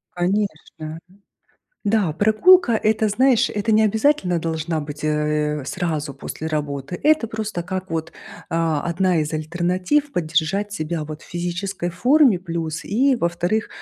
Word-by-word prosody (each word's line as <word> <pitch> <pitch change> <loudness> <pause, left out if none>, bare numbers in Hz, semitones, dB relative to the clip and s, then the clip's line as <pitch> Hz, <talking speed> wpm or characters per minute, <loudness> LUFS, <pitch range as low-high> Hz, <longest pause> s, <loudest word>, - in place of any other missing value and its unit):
Конечно. 175 -4 -2 0.9
Да, 205 -6 +2
прогулка- 230 - +5
это, 220 0 +2
знаешь, 245 +3 +3
это 210 +2 -2
не 215 0 +5
обязательно 215 - +2
должна 160 0 -2
быть, 145 0 -7
э, 150 -1 0
сразу 155 -6 -3
после 160 - -6
работы. 145 +1 -3
Это 305 -6 +3
просто 215 -5 -4
как 185 +1 -5
вот, 160 0 -3 0.4
а, 165 -2 +1
одна 175 0 +1
из 150 0 -3
альтернатив 180 - 0
поддержать 175 +5 0
себя 155 -2 -3
вот 155 0 -8
в - - -15
физической 175 +1 -3
форме, 245 - +4
плюс, 165 -4 -4
и, 260 +7 +2
во-вторых, 175 +1 -1
175 Hz, 135 wpm, -21 LUFS, 155-215 Hz, 0.9 s, прогулка